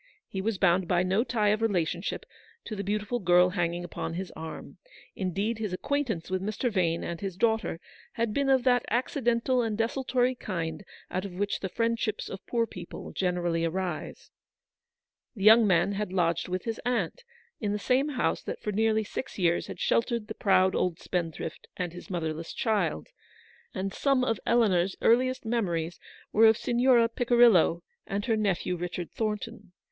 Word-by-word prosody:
He 190 Hz, -, -4 dB
was 215 Hz, 0 st, -1 dB
bound 185 Hz, -1 st, +3 dB
by 175 Hz, 0 st, +2 dB
no 190 Hz, +5 st, +2 dB
tie 215 Hz, -5 st, +1 dB
of 210 Hz, +1 st, +1 dB
relationship 180 Hz, -4 st, -1 dB, 0.4 s
to 215 Hz, -, -5 dB
the 200 Hz, -, -3 dB
beautiful 210 Hz, +4 st, -1 dB
girl 180 Hz, -2 st, +5 dB
hanging 175 Hz, -1 st, -1 dB
upon 165 Hz, -1 st, -5 dB
his 185 Hz, 0 st, -4 dB
arm. 160 Hz, 0 st, -8 dB, 0.4 s
Indeed, 200 Hz, +4 st, -2 dB
his 210 Hz, -4 st, -3 dB
acquaintance 230 Hz, -, -2 dB
with 185 Hz, 0 st, 0 dB
Mr. 215 Hz, +5 st, -1 dB
Vane 170 Hz, -5 st, +1 dB
and 170 Hz, -1 st, -5 dB
his 190 Hz, -3 st, -4 dB
daughter 220 Hz, -5 st, +1 dB, 0.3 s
had 230 Hz, -2 st, -1 dB
been 280 Hz, +2 st, +1 dB
of 265 Hz, -2 st, +4 dB
that 245 Hz, -1 st, +3 dB
acci 255 Hz, +3 st, -1 dB
dental 240 Hz, +2 st, +2 dB
and 220 Hz, -2 st, -2 dB
desultory 250 Hz, +2 st, +1 dB
kind 165 Hz, -8 st, -4 dB, 0.3 s
out 185 Hz, -, -1 dB
of 200 Hz, -3 st, -6 dB
which 205 Hz, +2 st, -1 dB
the 190 Hz, -, -4 dB
friend 230 Hz, +3 st, 0 dB
ships 215 Hz, -3 st, -2 dB
of 190 Hz, 0 st, -7 dB
poor 235 Hz, -1 st, +1 dB
people 180 Hz, -5 st, -9 dB
generally 175 Hz, -2 st, 0 dB
arise. 175 Hz, 0 st, -3 dB, 1.0 s
The 195 Hz, -, -5 dB
young 220 Hz, +1 st, +8 dB
man 175 Hz, +1 st, +3 dB
had 205 Hz, -1 st, -3 dB
lodged 170 Hz, -3 st, +1 dB
with 180 Hz, 0 st, -3 dB
his 225 Hz, -2 st, -4 dB
aunt 250 Hz, -, -1 dB, 0.4 s
in 210 Hz, -2 st, -1 dB
the 210 Hz, -, 0 dB
same 260 Hz, +7 st, +1 dB
house 270 Hz, -, 0 dB
that -, -, -5 dB
for 210 Hz, -, -3 dB
nearly 220 Hz, +1 st, +2 dB
six 215 Hz, -, -6 dB
years 175 Hz, -3 st, +1 dB
had -, -, -8 dB
sheltered 230 Hz, -2 st, +1 dB
the 220 Hz, -, -5 dB
proud 190 Hz, -3 st, +3 dB
old 180 Hz, -3 st, 0 dB
spendthrift 165 Hz, -2 st, -4 dB
and 180 Hz, -2 st, -3 dB
his 180 Hz, +4 st, -10 dB
motherless 165 Hz, -2 st, -3 dB
child, 220 Hz, -4 st, 0 dB, 0.7 s
and 195 Hz, 0 st, -3 dB
syme 275 Hz, -3 st, +2 dB
of 225 Hz, -5 st, 0 dB
Eleanor's 195 Hz, -6 st, +3 dB
earliest 255 Hz, +1 st, +2 dB
memories 175 Hz, -8 st, -1 dB, 0.3 s
were 225 Hz, +1 st, +6 dB
of 220 Hz, 0 st, +5 dB
Signora 240 Hz, -1 st, +3 dB
Picirillo 230 Hz, -8 st, +4 dB, 0.2 s
and 200 Hz, +1 st, -2 dB
her 225 Hz, -, +2 dB
nephew 195 Hz, -4 st, 0 dB
Richard 175 Hz, 0 st, -5 dB
Thornton. 215 Hz, -2 st, -4 dB
205 Hz, 175 wpm, -28 LUFS, 180-230 Hz, 1.0 s, young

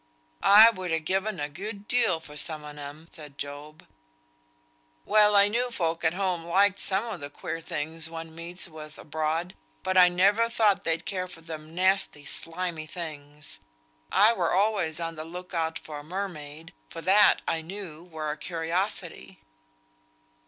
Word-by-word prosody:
"I 215 Hz, +3 st, +9 dB
would 185 Hz, -4 st, -5 dB
ha' 160 Hz, -1 st, -1 dB
given 190 Hz, +2 st, -1 dB
a 145 Hz, -, -1 dB
good 200 Hz, +6 st, -7 dB
deal 185 Hz, -9 st, +2 dB
for 150 Hz, -2 st, -12 dB
some 155 Hz, 0 st, -2 dB
on 150 Hz, 0 st, -9 dB
'em," 145 Hz, +3 st, -9 dB
said 150 Hz, -3 st, -11 dB
Job. 145 Hz, +2 st, -8 dB, 1.2 s
"Well, 210 Hz, -1 st, +5 dB
I 200 Hz, 0 st, +7 dB
knew 240 Hz, +4 st, +1 dB
folk 165 Hz, -7 st, -2 dB
at 160 Hz, +1 st, +2 dB
home 185 Hz, -3 st, -1 dB
liked 190 Hz, +3 st, +3 dB
some 195 Hz, +3 st, +1 dB
o' 225 Hz, -, -5 dB
the 145 Hz, -3 st, -7 dB
queer 165 Hz, +3 st, -6 dB
things 160 Hz, +1 st, -3 dB
one 165 Hz, 0 st, -8 dB
meets 170 Hz, +3 st, -3 dB
with 155 Hz, -2 st, -11 dB
abroad; 160 Hz, +3 st, -2 dB, 0.3 s
but 185 Hz, 0 st, 0 dB
I 180 Hz, 0 st, +8 dB
never 200 Hz, +6 st, +3 dB
thought 215 Hz, -4 st, +2 dB
they'd 165 Hz, 0 st, 0 dB
care 185 Hz, -2 st, -2 dB
for 175 Hz, -2 st, -11 dB
them 160 Hz, 0 st, -9 dB
nasty 185 Hz, -5 st, +1 dB
slimy 165 Hz, 0 st, -2 dB
things. 150 Hz, -3 st, -8 dB, 0.5 s
I 215 Hz, +3 st, +6 dB
were 175 Hz, -5 st, 0 dB
always 195 Hz, -6 st, +1 dB
on 165 Hz, -1 st, -3 dB
the 155 Hz, -1 st, -6 dB
look 180 Hz, +3 st, -9 dB
out 160 Hz, -1 st, -1 dB
for 150 Hz, -2 st, -8 dB
a -, -, -10 dB
mermaid, 165 Hz, -2 st, -6 dB, 0.2 s
for 165 Hz, -, -7 dB
that 205 Hz, +4 st, +5 dB
I 165 Hz, -1 st, 0 dB
knew 170 Hz, -2 st, -7 dB
were 160 Hz, -3 st, -4 dB
a 150 Hz, -, -5 dB
curiosity." 170 Hz, +5 st, -3 dB
165 Hz, 165 wpm, -27 LUFS, 155-190 Hz, 1.2 s, I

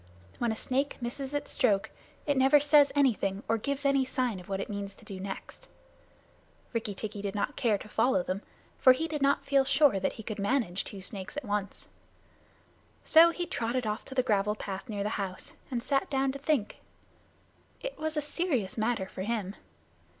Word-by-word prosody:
When 240 Hz, -2 st, +1 dB
a -, -, -2 dB
snake 270 Hz, +5 st, -1 dB
misses 260 Hz, +3 st, -4 dB
its 290 Hz, 0 st, -3 dB
stroke, 210 Hz, -8 st, +2 dB, 0.3 s
it 285 Hz, -, +2 dB
never 270 Hz, +2 st, +6 dB
says 290 Hz, 0 st, +5 dB
anything 210 Hz, -8 st, +2 dB
or 225 Hz, 0 st, +1 dB
gives 280 Hz, +4 st, -2 dB
any 275 Hz, -1 st, +4 dB
sign 255 Hz, -5 st, -1 dB
of 180 Hz, -, -13 dB
what 195 Hz, -1 st, -1 dB
it -, -, -3 dB
means 200 Hz, -1 st, -5 dB
to -, -, -18 dB
do 190 Hz, -2 st, -7 dB
next. 195 Hz, 0 st, -7 dB, 1.0 s
Rikki 220 Hz, -3 st, -2 dB
tikki 205 Hz, 0 st, -5 dB
did 200 Hz, 0 st, -3 dB
not 205 Hz, +8 st, -1 dB
care 225 Hz, -5 st, +2 dB
to 200 Hz, -, -11 dB
follow 210 Hz, -3 st, +2 dB
them, 185 Hz, +3 st, -3 dB, 0.4 s
for 255 Hz, -, +8 dB
he 315 Hz, +6 st, -2 dB
did 305 Hz, -2 st, -4 dB
not 280 Hz, 0 st, +2 dB
feel 275 Hz, -1 st, +4 dB
sure 275 Hz, -5 st, +4 dB
that 190 Hz, -, -1 dB
he 220 Hz, -, -9 dB
could 215 Hz, -1 st, -5 dB
manage 200 Hz, -4 st, 0 dB
two 195 Hz, -2 st, -8 dB
snakes 190 Hz, +5 st, -6 dB
at 295 Hz, -, -4 dB
once. 205 Hz, -2 st, -3 dB, 1.2 s
So 330 Hz, +1 st, +8 dB
he 350 Hz, +1 st, -3 dB
trotted 250 Hz, -7 st, -2 dB
off 215 Hz, 0 st, -2 dB
to 265 Hz, -, -8 dB
the 255 Hz, -, +3 dB
gravel 210 Hz, -3 st, +1 dB
path 195 Hz, +2 st, -6 dB
near 205 Hz, -2 st, -2 dB
the 210 Hz, -, -1 dB
house, 185 Hz, -1 st, -5 dB, 0.2 s
and 240 Hz, -3 st, -2 dB
sat 275 Hz, +1 st, +1 dB
down 270 Hz, -1 st, +1 dB
to 275 Hz, -, -7 dB
think. 275 Hz, -7 st, 0 dB, 1.0 s
It -, -, -6 dB
was 315 Hz, 0 st, -2 dB
a 300 Hz, -, +1 dB
serious 285 Hz, -, -1 dB
matter 220 Hz, -3 st, 0 dB
for 190 Hz, -, -8 dB
him. 205 Hz, -2 st, -2 dB
235 Hz, 195 wpm, -30 LUFS, 200-275 Hz, 1.2 s, for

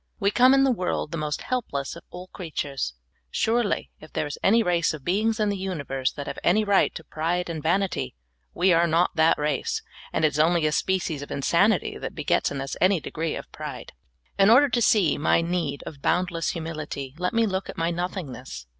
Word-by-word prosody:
We 200 Hz, -1 st, +2 dB
come 255 Hz, +4 st, +6 dB
in 270 Hz, -, +4 dB
the 270 Hz, -, +4 dB
world 180 Hz, -7 st, -2 dB
the 165 Hz, -, -3 dB
most 150 Hz, -1 st, -3 dB
helpless 145 Hz, -, -3 dB
of 170 Hz, -, -10 dB
all 180 Hz, +1 st, -8 dB
creatures. 145 Hz, -, -4 dB, 0.3 s
Surely, 225 Hz, -, 0 dB
if 155 Hz, -, -14 dB
there -, -, -1 dB
is 145 Hz, -, -6 dB
any 225 Hz, +3 st, +4 dB
race 170 Hz, -3 st, +1 dB
of 145 Hz, -, -12 dB
beings 215 Hz, +5 st, +1 dB
in 210 Hz, -1 st, +2 dB
the 200 Hz, -, 0 dB
universe 140 Hz, -9 st, -2 dB
that 145 Hz, -, -6 dB
have -, -, -5 dB
any 210 Hz, +5 st, +4 dB
right 200 Hz, -2 st, +3 dB
to 160 Hz, -, -7 dB
pride 170 Hz, +3 st, -2 dB
and 160 Hz, -2 st, -5 dB
vanity, 180 Hz, -, 0 dB, 0.4 s
we 180 Hz, +1 st, +3 dB
are 170 Hz, +1 st, +4 dB
not 170 Hz, +2 st, +2 dB
that 160 Hz, 0 st, +4 dB
race, 150 Hz, -2 st, -1 dB, 0.3 s
and 160 Hz, -, +1 dB
it -, -, +5 dB
is 150 Hz, -, -4 dB
only 165 Hz, +1 st, +3 dB
a 155 Hz, -, +2 dB
species 170 Hz, -3 st, 0 dB
of 145 Hz, -, -8 dB
insanit}' 175 Hz, +8 st, +1 dB
that -, -, -5 dB
begets 150 Hz, -3 st, +1 dB
in 140 Hz, -1 st, -4 dB
us 135 Hz, -, -4 dB
an}^ 185 Hz, -1 st, +4 dB
degree 160 Hz, 0 st, -3 dB
of -, -, -8 dB
pride. -, -, -7 dB, 0.5 s
In 195 Hz, +1 st, +6 dB
order 275 Hz, +5 st, +7 dB
to 240 Hz, 0 st, +1 dB
see 195 Hz, -10 st, +3 dB
my 150 Hz, -, +3 dB
need 165 Hz, -4 st, -2 dB
of 140 Hz, -3 st, -9 dB
boundless 175 Hz, 0 st, 0 dB
humilit}', 155 Hz, -5 st, -5 dB
let 180 Hz, 0 st, 0 dB
me 230 Hz, 0 st, +4 dB
look 190 Hz, -2 st, -2 dB
at -, -, -7 dB
my 165 Hz, +1 st, 0 dB
nothingness. 150 Hz, -, -5 dB
170 Hz, 210 wpm, -25 LUFS, 150-195 Hz, 0.5 s, order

